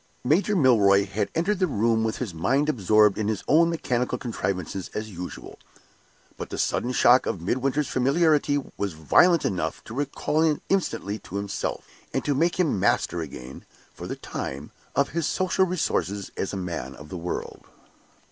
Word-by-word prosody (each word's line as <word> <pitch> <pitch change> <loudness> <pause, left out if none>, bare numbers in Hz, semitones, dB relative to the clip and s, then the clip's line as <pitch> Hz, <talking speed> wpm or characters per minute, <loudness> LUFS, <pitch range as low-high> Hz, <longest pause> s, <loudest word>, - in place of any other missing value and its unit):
Major 180 +10 +2
Milroy 105 - +5
had 100 - -2
entered 185 +4 +1
the 185 - +2
room 115 -4 +1
with 110 -1 -1
his 115 -9 -4
mind 130 - +1
absorbed 105 -4 +3
in 105 - -1
his 110 -2 -2
own 165 +3 +5
mechanical 125 -7 -1
contrivances 95 - -3
as 110 0 -4
usual. 90 0 -8 0.8
But - - -6
the - - -5
sudden 125 - 0
shock 125 0 +5
of 95 - -2
Midwinter's 130 - 0
familiarity 145 +2 +2 0.2
was 100 -3 -2
violent 165 - +4
enough 95 -2 -2
to - - -10
recall 145 +3 -1
him 155 -2 +2
instantly 110 - -1
to 95 - -11
himself, 100 -1 -3 0.3
and - - -1
to 145 - +2
make 170 +6 +1
him 155 - +2
master 90 -1 +1
again, 65 -4 -8 0.3
for - - -8
the - - -4
time, 70 +3 -6 0.2
of 140 - +2
his 165 -1 -1
social 185 0 +1
resources 100 - -1
as 95 - -2
a 100 - -4
man 85 -7 -5
of 75 +3 -12
the - - -7
world. 85 +1 -5
115 Hz, 170 wpm, -25 LUFS, 95-150 Hz, 0.8 s, Milroy